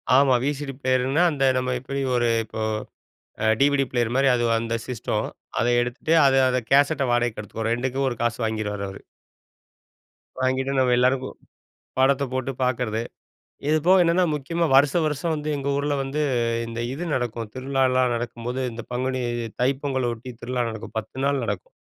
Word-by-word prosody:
ஆமா, 135 -2 +5
விசிடி 145 -1 -2
பிளேயர்ன்னா 130 +5 +2
அந்த 140 -2 0
நம்ம 125 0 0
எப்டி 135 +2 -4
ஒரு 120 0 +2 0.2
இப்போ 110 0 -7 0.8
அ - - +3
டிவிடி 140 -1 +4
பிளேயர் 120 -2 0
மாரி 135 0 +3
அது 120 0 0
அந்த 115 0 -2
சிஸ்டம். 125 -4 -2 0.3
அத 120 - +2
எடுத்துட்டு 125 +6 -1
அத 135 -1 +4
அத 125 - +1
கேசெட்ட 140 +1 +4
வாடகைக்கு 120 -2 +1
எடுத்துக்க 110 +2 -4
ரெண்டுக்கும் 130 +3 0
ஒரு 120 - -4
காசு 120 0 -1
வாங்கிருவாரு 105 -2 -2
அவரு. 95 - -10 1.4
வாங்கிட்டு 130 +1 0
நம்ம 125 -1 +3
எல்லாருக்கும் 130 +1 +1 0.6
படத்த 140 +1 +3
போட்டு 130 +1 -1
பார்க்குறது. 120 -3 0 0.7
இது 155 - +4
போக 185 0 +6
என்னென்ன 170 +2 +3
முக்கியமா 165 +4 -1
வருஷம் 145 +4 +4
வருஷம் 150 +3 -1
வந்து 150 0 -4
எங்க 140 0 -3
ஊர்ல 145 +1 0
வந்து 135 +3 -3 0.5
இந்த 115 0 -5
இது 160 +6 -4
நடக்கும். 120 -3 -2
திருவிழாலாம் 130 -1 +1
நடக்கும்போது, 120 +2 -4
இந்த 115 0 -7
பங்குனி 130 +1 -1 0.4
தைப்பொங்கல்ல 130 -2 0
ஒட்டி 120 +3 -10
திருவிழா 125 0 -1
நடக்கும், 110 -1 -8
10 110 +4 -7
நாள் 140 -2 +1
நடக்கும் 100 -4 -5
130 Hz, 155 wpm, -24 LUFS, 120-140 Hz, 1.4 s, போக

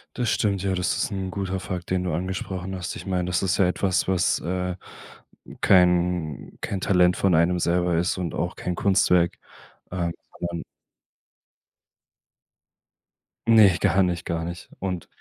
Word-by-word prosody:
Das 125 -2 0
stimmt. 100 -3 0
Ja, 95 -1 0
das 90 -1 0
ist - - -1
'n 95 -1 -3
guter 95 0 -3
Fakt, 90 -1 -6
den 95 -1 +1
du 90 -3 -2
angesprochen 95 +2 -4
hast. 90 -1 -5
Ich - - -8
meine, 90 -2 -1
das 90 0 0
ist 95 0 +1
ja 95 - +4
etwas, 95 +1 0
was, 95 -2 +2
äh, 90 +1 -2 0.9
kein 90 -4 +2
kein 95 -2 -3
Talent 90 -2 +3
von 95 -2 +2
einem 85 +2 +3
selber 85 0 +1
ist 85 +2 0
und 90 -3 -3
auch - - -2
kein 90 - -3
Kunstwerk, 90 -2 +3 0.5
äh, 85 -2 -1 0.3
sondern 85 -1 -4 2.9
Ne, 105 -6 +7
gar 95 +2 +3
nicht, 85 -2 -2
gar 85 -1 -2
nicht. 85 +1 -7
Und 90 -3 -4
90 Hz, 155 wpm, -24 LUFS, 85-95 Hz, 2.9 s, Ne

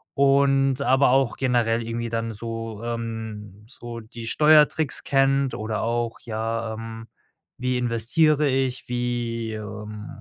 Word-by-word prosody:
und 135 -1 +3
aber 135 -1 +4
auch 135 -2 +2
generell 120 -3 +1
irgendwie 115 0 -3
dann 115 0 -2
so, 115 0 -6
ähm 110 -3 -5
so 120 -2 -8
die 115 +1 -10
Steuertricks 155 +2 +4
kennt 135 -1 +2
oder 110 -1 -3
auch 115 0 -1
ja, 115 0 -3
ähm, 115 0 -8 0.5
wie 125 0 -1
investiere 135 +6 +2
ich, 130 -2 -1
wie, 120 -2 -2
ähm 105 0 -7
115 Hz, 125 wpm, -24 LUFS, 115-135 Hz, 0.5 s, aber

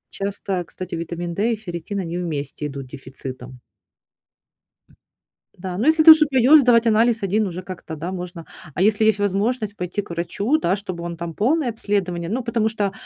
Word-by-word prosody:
Часто, 200 0 -3
кстати, 185 -1 -7
витамин 170 +1 -4
D 215 +6 +1
и - - 0
ферритин, 200 -1 -6
они 175 -2 -4
вместе 150 -4 -4
идут 140 -2 -7
дефицитом. 130 -1 -9 2.0
Да, 180 0 -6
но 220 - -1
если 315 0 +5
ты 320 - +12
уже 315 -1 +7
пойдёшь 270 +2 +6
сдавать 240 -2 +4
анализ 225 0 +3
1 205 +2 +1
уже 180 0 -5
как-то, 180 -3 -8
да, 165 +4 -5
можно. 175 -2 -7 0.3
А - - -1
если 215 +2 +3
есть 215 -2 +3
возможность 205 +2 -1
пойти 180 +3 -3
к 200 - -12
врачу, 200 - 0
да, 185 - +1
чтобы 185 -4 -6
он 170 0 -5
там 170 0 -5
полное 265 - +1
обследование. 185 -6 -2
Ну, 245 +5 -2
потому 230 -2 0
что, 205 -3 -1
195 Hz, 180 wpm, -22 LUFS, 170-220 Hz, 2.0 s, ты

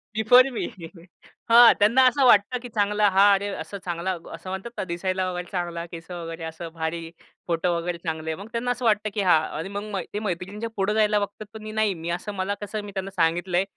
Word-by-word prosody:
Before 245 +4 +6
me 235 - -3 0.8
हां, 235 0 +9
त्यांना 230 +6 +5
असं 270 +1 +3
वाटतं 240 +1 +4
की 245 - -8
चांगला 210 0 +2
हा 195 +1 +5
अरे 200 +1 0
असं 200 - -7
चांगला 175 +2 -2 0.2
असं 165 +3 -8
म्हणतात 190 +5 -5
ना, - - -1
दिसायला 185 +1 -2
वगैरे 180 0 -6
चांगला 175 -2 -3
केस 165 0 -11
वगैरे 165 -1 -6
असं 160 +1 -6
भारी 165 0 -4 0.4
फोटो 170 +1 0
वगैरे 170 +1 -3
चांगले 160 -2 -4
आहे. 160 - -3
मग 200 - -9
त्यांना 235 +2 -1
असं 245 0 -3
वाटतं 215 -1 +2
की 205 - -1
हां, 180 -5 +5 0.2
आणि 165 +5 -4
मग 205 +1 -5
मै 190 - -2
ते 210 - -2
मैत्रिणींच्या 205 +3 -4
पुढे 195 +1 0
जायला 210 -1 +3
बघतात 205 +1 -5
पण 220 - -9
मी 215 - -6
नाही, 215 -2 +1
मी 165 -1 -6
असं 210 +1 -6
मला 190 +1 -2
कसं 210 +1 -4
मी 205 - -8
त्यांना 195 0 -5
सांगितलंय 175 +2 +1
195 Hz, 220 wpm, -24 LUFS, 170-215 Hz, 0.8 s, हां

